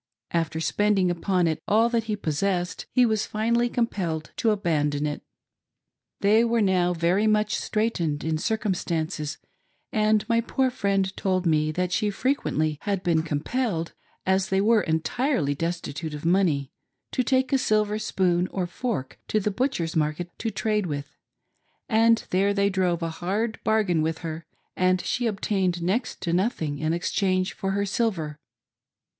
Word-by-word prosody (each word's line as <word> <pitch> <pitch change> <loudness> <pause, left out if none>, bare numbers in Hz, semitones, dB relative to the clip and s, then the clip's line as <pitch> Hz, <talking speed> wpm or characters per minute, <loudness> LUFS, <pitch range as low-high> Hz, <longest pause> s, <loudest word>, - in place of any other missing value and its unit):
After 165 -1 -1
spending 195 +1 +2
upon 180 +1 +1
it 160 -2 -1
all 220 +3 +4
that 230 -2 0
he 215 -1 -1
possessed, 180 0 -2
he 250 -1 +4
was 220 -2 0
finally 235 +3 +1
compelled 180 -10 -2
to 230 - +2
abandon 150 -8 +1
it. 150 0 -3 1.0
They 215 +3 +5
were 235 0 +2
now 185 -4 +3
very 175 +6 +2
much 215 0 +2
straightened 175 -9 -1
in 160 -1 -1
circumstances, 170 -7 -2 0.6
and 215 -2 +2
my 230 -1 +3
poor 260 +2 0
friend 195 -4 0
told 185 -1 0
me 155 -2 +2
that 180 +2 -1
she 210 - +1
had 205 - -3
frequently 155 - 0 0.2
been 165 -3 +2
compelled 165 - -2 0.2
— - - -39
as 190 0 -1
they 190 - +2
were 220 +2 +4
entirely 160 - 0
destitute 160 -1 -4
of 150 - -8
money 165 -6 +2 0.2
— - - -55
to - - +1
take 260 +1 +1
a 270 - +4
silver 215 -3 +1
spoon 185 -4 +1
or 185 -1 -2
fork 175 - -4
to 215 - +1
the 210 +1 -1
butcher's 195 -8 -1
market 155 +3 -1
to 225 - -1
trade 210 -3 0
with, 145 -1 -5 0.7
and 230 0 +3
there 200 +2 +2
they 200 0 +2
drove 180 -3 0
a 165 - -1
hard 215 +6 -1
bargain 205 -7 +2
with 160 +1 -1
her, 160 0 -5 0.3
and 185 0 +2
she 245 -1 0
obtained 190 -4 0
next 215 +9 -1
to 170 - -1
nothing 170 - 0
in 155 +1 0
exchange 185 +2 0
for 195 0 -2
her 200 +1 0
silver. 190 -8 -1
190 Hz, 160 wpm, -25 LUFS, 165-215 Hz, 1.0 s, They